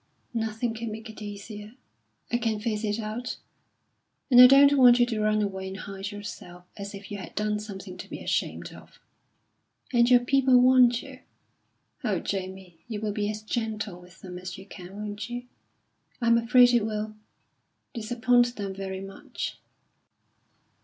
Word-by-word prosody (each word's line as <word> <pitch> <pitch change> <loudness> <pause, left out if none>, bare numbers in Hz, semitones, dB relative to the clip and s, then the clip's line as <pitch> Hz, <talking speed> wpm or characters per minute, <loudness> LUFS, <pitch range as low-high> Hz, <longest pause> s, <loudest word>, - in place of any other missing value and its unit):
"Nothing 225 +1 -2
can 225 0 -5
make 220 +1 -8
it 215 - -13
easier. 210 +1 -8 0.6
I 240 - +2
can 225 -3 -1
face 215 -1 -2
it 210 -1 0
out. 225 +3 -4 0.9
And 245 0 +9
I 250 - +12
don't 280 +2 +7
want 250 -3 +7
you 240 - +6
to 225 -3 -2
run 215 0 +2
away 190 -1 -4
and 190 0 -6
hide 195 +1 -6
yourself 180 -4 -9
as 200 0 -7
if 200 +2 -11
you 205 - -4
had - - -10
done 210 0 0
something 195 -3 -8
to - - -9
be - - -6
ashamed - - -2
of. - - -16 0.9
And 240 0 +4
your 245 -1 +6
people 260 0 +4
want 250 -1 +5
you. 270 -2 -11 0.8
Oh, 210 -6 +1
Jamie, 185 -2 -5
you 220 -3 -4
will 215 0 -2
be 205 0 -1
as 215 0 -5
gentle 215 -5 -3
with 180 -1 -17
them 180 -1 -8
as 185 0 -7
you 190 - -11
can, 190 -1 -11
won't 210 +1 -5
you? 245 +1 -5 0.7
I'm 235 -1 +4
afraid 245 +1 +5
it 240 -3 +3
will 215 0 -3 0.8
disappoint 240 +1 +2
them 200 -2 -4
very 190 0 -5
much." 195 0 -7
215 Hz, 165 wpm, -27 LUFS, 200-240 Hz, 0.9 s, I